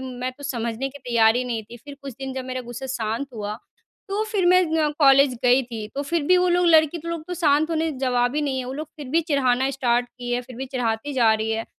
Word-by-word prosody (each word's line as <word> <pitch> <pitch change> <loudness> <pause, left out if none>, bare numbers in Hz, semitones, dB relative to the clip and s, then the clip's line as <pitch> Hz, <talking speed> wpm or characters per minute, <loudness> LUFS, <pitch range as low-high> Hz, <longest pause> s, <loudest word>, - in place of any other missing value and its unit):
मैं 255 0 -4
तो 285 +3 -15
समझने 235 -1 -3
के 285 +1 -12
तैयार 235 -3 +3
ही 255 - 0
नहीं 230 -3 -3
थी। 240 - -9
फिर 285 +5 -11
कुछ 275 -2 -6
दिन 270 0 -5
जब 260 -1 -4
मेरा 255 0 -4
गुस्सा 240 +2 -7
शांत 230 0 -3
हुआ, 210 -1 -4 0.5
तो 405 +2 -1
फिर 385 -4 +1
मैं 365 +1 +6 0.2
अ, 300 - +2
कॉलेज 275 -2 +5
गई 250 +2 +5
थी। 225 -3 -6
तो 280 - -2
फिर 325 +2 -1
भी 365 +2 +5
वो 360 0 +3
लोग 355 0 +3
लड़की 320 0 +4
लोग 335 -2 -4
तो 360 - -3
शांत 315 -2 +2
होने 325 0 0
जवाब 245 0 +1
ही - - +2
नहीं 270 -2 -1
है, 255 - -3
वो 255 - -5
लोग 300 +2 -6
फिर 295 -3 -8
भी 320 +5 +2
चिढ़ाना 265 -1 +2
स्टार्ट 245 -2 0
किए, 245 0 -3
फिर 250 -1 -12
भी 265 +1 -5
चिढ़ाती 250 +1 -2
जा 235 -4 +4
रही 220 0 -2
है। 225 0 -2
260 Hz, 255 wpm, -23 LUFS, 245-290 Hz, 0.5 s, मैं